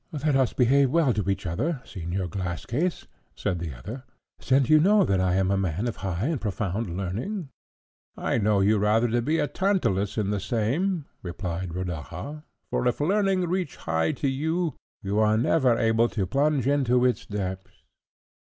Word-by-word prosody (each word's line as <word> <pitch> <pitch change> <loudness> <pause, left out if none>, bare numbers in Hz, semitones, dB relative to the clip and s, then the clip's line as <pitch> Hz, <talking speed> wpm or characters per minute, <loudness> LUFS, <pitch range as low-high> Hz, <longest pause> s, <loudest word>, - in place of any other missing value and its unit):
"Let 150 -2 0
us 130 -2 +3
behave 135 +2 +3
well 150 -3 +3
to 100 -3 -1
each 95 - -1
other, 135 - -1
Señor 90 -1 -4
Glasscase," 100 - -2 0.3
said 90 - -2
the 80 -6 -5
other, 110 - -7 0.4
"since 130 0 +2
you 155 +1 +6
know 200 +5 +5
that 95 - +1
I 90 -1 +2
am 95 0 +2
a 100 - +2
man 95 +3 -1
of 120 - -4
high 95 +1 -2
and 150 -3 -1
profound 100 -2 -2
learning." 125 - -3 0.7
"I - - 0
know 105 -1 +2
you 105 +2 +3
rather 110 +3 +3
to 120 +1 +1
be 155 +7 0
a - - +2
Tantalus 145 - 0
in 105 -2 0
the 105 - 0
same," 135 - -1 0.2
replied 90 -1 -4
Rodaja; 90 - -5 0.3
"for 125 - +1
if 125 - 0
learning 195 +4 +2
reach 180 -3 -2
high 80 0 0
to 140 - -2
you, 160 +4 -1 0.3
you 100 +2 0
are 110 0 +3
never 125 0 +3
able 115 +1 +3
to 100 -5 -1
plunge 140 +5 +1
into 130 -3 +3
its 125 - 0
depths." 95 -2 -5
115 Hz, 175 wpm, -26 LUFS, 95-145 Hz, 0.7 s, you